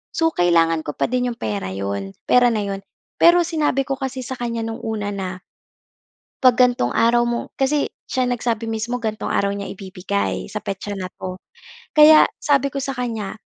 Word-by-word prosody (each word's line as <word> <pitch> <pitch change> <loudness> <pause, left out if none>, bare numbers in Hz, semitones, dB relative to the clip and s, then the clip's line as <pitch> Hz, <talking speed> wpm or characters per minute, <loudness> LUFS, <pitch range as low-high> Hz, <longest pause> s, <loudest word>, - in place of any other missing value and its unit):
So, 325 0 +2
kailangan 165 - +2
ko 150 - -4
pa 140 - 0
din 250 0 0
yung 235 - -10
pera 100 -3 -3
'yon 100 0 -4 0.2
pera 245 -1 +5
na 220 - 0
'yon. 195 -1 -4 0.4
Pero, 345 +1 +7
sinabi 300 -5 0
ko 275 - 0
kasi 265 -1 -5
sa 260 - -4
kanya 235 -2 -3
noong 225 +1 -5
una 220 -2 -3
na, 190 -2 -3 1.1
'pag 255 -2 +6
gantong 245 - +3
araw 235 +1 +4
mo 235 0 -1 0.2
kasi, 280 +2 +1 0.2
siya 255 - 0
nagsabi 235 -2 -1
mismo 225 +2 -2
gantong 215 -2 -3
araw 200 - +1
niya 200 0 -5
ibibigay, 195 +1 -3
sa 210 - -3
petsa 200 +1 -4
na 185 - -4
'to. 185 0 -6 0.6
Kaya, 310 0 +8 0.2
sabi 280 -2 +2
ko 280 - -2
sa 270 0 -3
kanya, 225 -5 -4
230 Hz, 180 wpm, -21 LUFS, 195-255 Hz, 1.1 s, Kaya